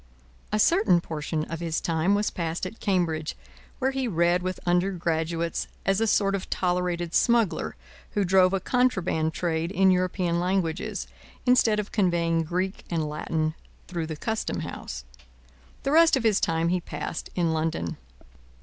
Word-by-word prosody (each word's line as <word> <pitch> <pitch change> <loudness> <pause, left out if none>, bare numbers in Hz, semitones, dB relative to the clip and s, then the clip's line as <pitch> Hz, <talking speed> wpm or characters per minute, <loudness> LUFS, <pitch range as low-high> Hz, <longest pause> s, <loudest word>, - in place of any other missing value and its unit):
A 215 - +1
certain 215 - +4
portion 155 -1 -3
of 165 - -5
his 165 -2 -1
time 165 +4 +1
was 210 +1 0
passed 170 0 -3
at 200 +5 -7
Cambridge, 165 -6 0 0.4
where 265 0 +1
he 265 -1 -1
read 175 -2 +2
with 185 +1 -3
undergraduates 170 -2 0 0.2
as 195 +2 +2
a 225 - +2
sort 200 -2 +3
of 195 -1 -3
tolerated 175 -2 -1
smuggler 235 -5 +2 0.4
who 205 -2 +1
drove 185 0 +5
a 195 - +1
contraband 190 -9 +1
trade 165 0 -1
in 190 -1 +4
European 180 -1 +1
languages, 180 -2 -1 0.4
instead 240 -4 +4
of 210 - -4
conveying 170 -4 +2
Greek 185 +4 -2
and 160 -3 -1
Latin 155 +1 -1 0.3
through 170 -3 -3
the 160 - -4
Custom 220 +6 -2
house. - - -6 0.8
The 275 - 0
rest 325 -2 +6
of 255 - -2
his 215 -3 +3
time 165 +1 +1
he 180 0 +1
passed 165 - -5
in 170 -3 +1
London. 155 - -2
180 Hz, 155 wpm, -26 LUFS, 165-195 Hz, 0.8 s, rest